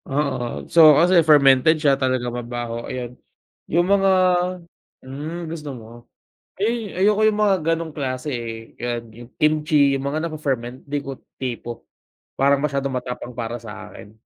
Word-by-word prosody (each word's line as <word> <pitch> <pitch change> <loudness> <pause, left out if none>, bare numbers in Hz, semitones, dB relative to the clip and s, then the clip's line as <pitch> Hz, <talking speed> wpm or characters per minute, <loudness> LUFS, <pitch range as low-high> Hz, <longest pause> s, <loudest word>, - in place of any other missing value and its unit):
Oo, 135 -4 -2
so 155 -3 +7
kasi 175 +2 +5
fermented 150 -1 +5
siya, 150 -2 +3
talagang 130 -3 -1
mabaho, 120 -1 -5
ayan. 125 -1 -5 0.5
Yung 175 +3 +1
mga 195 -1 +4 0.9
hmm, 155 +6 -6
gusto 155 -3 -6
mo. 115 -4 -11 0.7
Ay, 220 -1 -2
ayoko 210 +3 +3
yung 215 - 0
mga 200 -2 +4
ganong 165 0 -1
klase, 135 0 -4
eh, 115 -2 -6
yan 120 -1 -2
yung 120 +2 -13
kimchi, 150 -2 +3
yung 135 - -1
mga 155 +3 -2
nafe-ferment, 135 -6 -3
di 145 0 -2
ko 135 -1 -7 0.2
tipo. 120 -2 -6 0.5
Parang 140 +1 +3
masyadong 140 -2 -1
matapang 125 -1 -5
para 120 0 -4
sa 110 -3 -10
akin. 105 +2 -13
140 Hz, 145 wpm, -22 LUFS, 120-160 Hz, 0.9 s, so